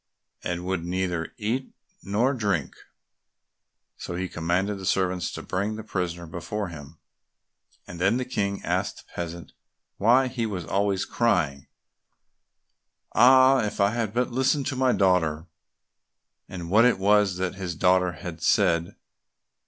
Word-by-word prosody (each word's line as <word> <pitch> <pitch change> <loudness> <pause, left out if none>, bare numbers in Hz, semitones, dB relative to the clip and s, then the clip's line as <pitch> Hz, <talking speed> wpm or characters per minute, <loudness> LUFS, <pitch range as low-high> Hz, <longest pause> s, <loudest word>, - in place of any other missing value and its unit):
and 90 0 -3
would 95 -2 -2
neither 90 -1 -2
eat 120 +5 -2 0.3
nor 115 +8 +1
drink. 100 - -1 1.2
So 90 - -6
he 95 +1 -2
commanded 90 +5 -1
the 95 - -7
servants 95 -2 0
to - - -6
bring 100 +4 -2
the 110 - -7
prisoner 90 -4 -3
before 85 +5 -5
him, 75 -1 -11 0.9
and 85 -1 -9
then 100 +6 +3
the 130 - -2
King 100 -5 -2
asked - - -1
the - - -24
peasant 85 -1 -6 0.5
why 125 +6 +4
he 120 -3 -2
was 95 -6 -4
always 100 0 0
crying, 85 - 0 1.5
"Ah! 130 +3 +6
if 105 - -4
I 100 0 +4
had 115 -3 -2
but 125 +3 -1
listened 130 +3 +1
to 130 - -3
my 130 0 +2
daughter!" 90 -7 +2 1.0
and 90 -2 -7
what 110 +3 +6
it 120 -4 +4
was 100 -1 +3
that 90 -1 -2
his 95 -3 -5
daughter 90 +1 +3
had 85 0 -8
said. 85 -1 +2
95 Hz, 145 wpm, -25 LUFS, 85-110 Hz, 1.5 s, Ah